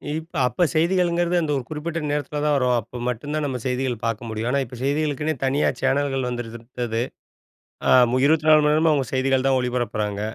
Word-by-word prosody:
இப்ப 160 +2 -7
அப்ப 150 +8 0
செய்திகளுங்கறது 175 +1 +1
அந்த 155 -2 -1
ஒரு 130 - -4
குறிப்பிட்ட 160 +2 -4
நேரத்துல 150 0 -2
தான் 150 - +3
வரும். 125 -2 +2
அப்ப 120 +3 -10
மட்டும்தான் 145 +5 -2
நம்ம 130 -3 -3
செய்திகள் 125 0 -1
பாக்க 115 -2 -1
முடியும். 110 +2 -3
ஆனா, 140 - +2
இப்ப 125 - -11
செய்திகளுக்குன்னே 150 +2 0
தனியா 135 +2 +2
சேனல்கள் 135 -1 0
வந்துவிட்டது 115 -1 -4 0.9
ஆ - - +5 0.2
மு 130 - +1
24 155 0 +5
மணி 150 - +3
நேரமும் 160 +1 +3
அவங்க 140 -3 +1
செய்திகள் 130 0 +1
தான் 135 -1 +3
ஒளிபரப்புறாங்க. 115 -5 -2
135 Hz, 175 wpm, -23 LUFS, 125-155 Hz, 0.9 s, ஆ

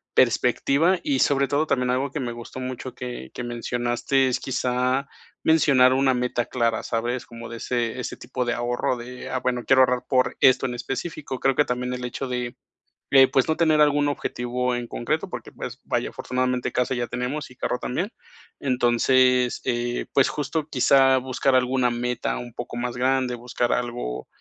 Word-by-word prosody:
perspectiva, 170 +6 +3
y 140 -3 0
sobre 140 0 +3
todo 145 +3 +1
también 125 -3 +1
algo 130 +2 0
que 150 - -4
me 120 -3 -3
gustó 120 +2 -9
mucho 130 0 -5
que 120 - -6
que 120 - -5
mencionaste 120 +2 0
es 125 - -1
quizá 130 +1 0 0.4
mencionar 140 -5 +5
una 135 0 +3
meta 125 -1 -1
clara, 115 -2 0
¿sabes?, 120 +2 -2
como 115 -1 -9
de 115 - -7
ese 120 +1 -2
ese 125 - -5
tipo 125 0 -3
de 120 - 0
ahorro 120 +1 -1
de: 125 +1 -8
"Ah, 130 - -1
bueno, 125 -1 -1
quiero 130 -1 +5
ahorrar 125 -1 +1
por 130 -1 +2
esto 130 0 +5
en 125 - -2
específico". 135 +2 -5
Creo 135 -1 +2
que 145 - +4
también 125 0 -2
el 125 0 -5
hecho 130 +2 -4
de 125 -1 -3 0.6
de, 135 -1 +8
pues, 130 0 +2
no 160 - +2
tener 160 -2 +3
algún 145 -1 +4
objetivo 125 -2 -2
en 120 -1 -4
concreto, - - -2
porque, - - -7
pues, - - -7
vaya, - - -1
afortunadamente 125 -1 -2
casa 125 +1 0
ya 120 -1 -1
tenemos 125 +4 -4
y - - -15
carro 125 - -2
también, 180 - -2 0.5
entonces, 125 0 +3
eh, 120 -1 -1
pues, 135 - +4
justo 150 +1 -2
quizá 135 0 +4
buscar 130 +1 0
alguna 125 -1 +2
meta 120 0 -2
un 120 -1 -8
poco 120 0 -6
más 120 0 -3
grande, 130 0 +1
buscar 120 0 -2
algo, 120 - -3
125 Hz, 180 wpm, -24 LUFS, 120-135 Hz, 0.6 s, de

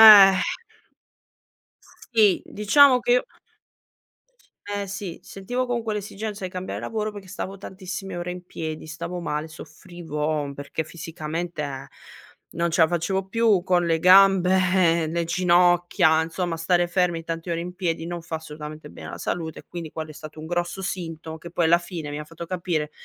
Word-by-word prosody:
Eh. 200 -3 +11 1.8
Sì 210 -5 +5
diciamo 255 +5 +5
che 240 - +2
io 250 - +4 1.4
Eh 205 -1 -3
sì, 195 -3 -6
sentivo 245 +7 -3
con 240 -1 -1
quell'esigenza 210 -1 -4
di 185 - -4
cambiare 185 0 -5
lavoro 215 -1 -2
perché 205 -2 -10
stavo 195 +1 -6
tantissime 190 0 -7
ore 175 0 -3
in 180 0 -9
piedi, 160 -3 -6
stavo 170 +3 -5
male, 150 -1 -3
soffrivo 155 -3 -4
perché 145 +3 -4
fisicamente 160 -3 -5 0.6
non 170 0 -1
ce 165 - +3
la 160 - +5
facevo 185 +3 -1
più 220 -4 +3
con 175 -2 +2
le 165 -1 +2
gambe, 190 +1 +6 0.5
ehm, 155 - -4
le 170 0 0
ginocchia, 175 -1 +4
insomma 165 +1 -2
stare 175 +1 +2
fermi 175 -2 0
tanti 165 +1 -5
ore 170 0 -1
in 180 +1 -6
piedi 165 -3 -2
non 175 0 -4
fa 165 -1 -4
assolutamente 150 -1 -9
bene - - -10
alla - - -7
salute 160 -2 -3
e - - -23
quindi 170 -3 -6
quello 155 0 -6
è - - -8
stato 155 +1 -10
un 155 - -7
grosso 175 +3 -2
sintomo 165 -4 -5
che 170 +2 -10
poi 170 0 0
alla 170 - +6
fine 170 -4 -6
mi 145 - -4
ha 150 - -6
fatto 165 +2 -9
capire 170 -4 -2
175 Hz, 165 wpm, -24 LUFS, 160-190 Hz, 1.8 s, Eh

